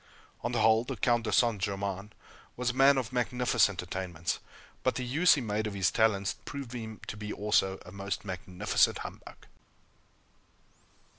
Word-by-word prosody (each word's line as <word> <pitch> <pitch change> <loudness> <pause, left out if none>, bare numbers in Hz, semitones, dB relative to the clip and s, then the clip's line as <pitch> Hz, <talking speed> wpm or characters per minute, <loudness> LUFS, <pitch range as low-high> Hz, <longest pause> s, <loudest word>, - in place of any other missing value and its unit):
On - - -2
the - - 0
whole, 110 0 +5
the - - -5
Count 120 -2 +1
de 110 - -1
St. 115 -1 +3
Germain 100 0 -3 0.5
was 125 0 0
a - - -11
man 135 +2 +6
of 125 -2 -2
magnificent 125 -5 +2
attainments, 90 -2 -3 0.4
but - - +1
the 125 - -2
use 155 +9 +5
he 140 - -2
made 110 -1 -1
of 105 - -5
his 95 -2 +2
talents 100 -3 +2
proved 140 -4 -7
him 110 -3 -6
to - - -6
be 105 0 -6
also 95 -2 +1
a 90 - -10
most 100 +1 -4
magnificent 90 -1 +1
humbug. - - -10
110 Hz, 165 wpm, -30 LUFS, 100-125 Hz, 0.5 s, man